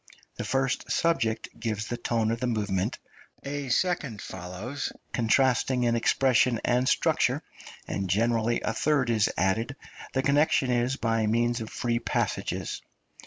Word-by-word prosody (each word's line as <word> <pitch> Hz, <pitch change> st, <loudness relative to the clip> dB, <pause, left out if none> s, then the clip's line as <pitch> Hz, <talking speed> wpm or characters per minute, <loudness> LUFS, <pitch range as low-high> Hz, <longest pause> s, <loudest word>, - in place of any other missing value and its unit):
The -, -, -3 dB
first 135 Hz, -1 st, -1 dB
subject 130 Hz, -10 st, +1 dB
gives 110 Hz, -2 st, -2 dB
the 120 Hz, -, -3 dB
tone 115 Hz, -2 st, 0 dB
of 115 Hz, -, -2 dB
the 125 Hz, -, -1 dB
movement, 100 Hz, -5 st, -1 dB, 0.5 s
a 140 Hz, -1 st, -4 dB
second 140 Hz, -, 0 dB
follows, 95 Hz, +12 st, -5 dB, 0.2 s
contrasting 125 Hz, +2 st, +2 dB
in 120 Hz, -1 st, +2 dB
expression 125 Hz, 0 st, +3 dB
and 125 Hz, +1 st, +2 dB
structure, -, -, +2 dB, 0.4 s
and 95 Hz, -1 st, -3 dB
generally 115 Hz, +3 st, +1 dB
a 115 Hz, -, -1 dB
third 140 Hz, -4 st, +1 dB
is 110 Hz, -2 st, +3 dB
added; 110 Hz, +9 st, 0 dB, 0.4 s
the 130 Hz, -, +1 dB
connection 140 Hz, -2 st, +3 dB
is 120 Hz, +2 st, +1 dB
by 115 Hz, -3 st, 0 dB
means 120 Hz, +2 st, +1 dB
of 110 Hz, -, -5 dB
free 120 Hz, -1 st, -1 dB
passages. -, -, -2 dB
120 Hz, 140 wpm, -27 LUFS, 110-130 Hz, 0.5 s, expression